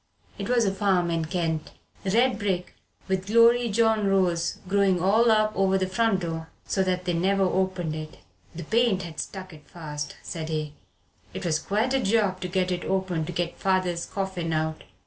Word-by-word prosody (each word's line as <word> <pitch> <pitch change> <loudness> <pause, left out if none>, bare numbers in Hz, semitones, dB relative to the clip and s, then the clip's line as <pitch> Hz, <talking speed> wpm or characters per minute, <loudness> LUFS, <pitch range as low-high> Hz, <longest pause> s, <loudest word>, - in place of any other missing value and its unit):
It - - -4
was 240 -2 +3
a 195 - +1
farm 190 -4 +1
in 165 -1 0
Kent 160 -2 -2 0.3
"red 235 +7 +2
brick 190 -4 -2 0.3
with 190 0 -1
the 210 - -4
glorydyjohn 230 -2 +4
rose 180 -3 +1
growin' 195 -1 +2
all 215 +6 +4
up 215 -1 +3
over 195 0 +2
the 190 - 0
front 195 +1 +1
door 165 -1 -4 0.2
so 195 - 0
that 185 -1 0
they 175 - 0
never 195 +3 +2
opened 185 -3 0
it." 155 0 -7 0.4
"The 170 - -6
paint 220 0 +2
had 165 -2 -8
stuck 185 -2 -6
it 150 -2 -16
fast," 150 -3 -6
said 160 -2 -5
he, 155 -2 -3 0.6
"it - - -5
was 155 -2 +1
quite 220 +9 0
a 270 - +3
job 200 -4 +1
to 180 - -2
get 185 0 0
it 180 -1 -2
open 185 -4 -1
to 180 - -5
get 175 0 -3
father's 185 -3 0
coffin 190 -4 -3
out. 155 0 -2
185 Hz, 185 wpm, -26 LUFS, 170-200 Hz, 0.6 s, glorydyjohn